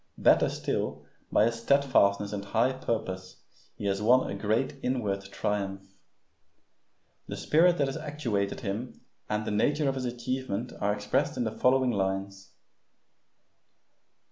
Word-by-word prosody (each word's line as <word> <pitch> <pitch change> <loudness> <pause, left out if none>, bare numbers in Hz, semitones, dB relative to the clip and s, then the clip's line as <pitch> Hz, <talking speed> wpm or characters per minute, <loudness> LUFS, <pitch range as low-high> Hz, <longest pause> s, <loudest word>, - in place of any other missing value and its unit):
Better - - +5
still, - - -3 0.3
by 105 - +5
his 115 0 -1
steadfastness 115 -7 +3
and 100 -1 -3
high 115 +6 +1
purpose 95 -7 -4 0.3
he - - -7
has 100 0 0
won 125 +4 +4
a - - -3
great 110 +7 -1
inward 105 -6 -1
triumph. 100 0 -3 1.3
The - - -5
spirit 175 +3 +4
that 140 - +2
has 135 +2 -3
actuated 135 -11 -2
him 110 +5 -4 0.3
and 105 0 -1
the - - -2
nature 145 +8 +2
of 135 - +2
his 130 -1 -3
achievement 120 -1 -3
are 100 - +2
expressed 105 +7 0
in 125 - +1
the 110 - -1
following 130 +2 +3
lines. 95 0 -3
110 Hz, 140 wpm, -28 LUFS, 100-130 Hz, 1.3 s, Better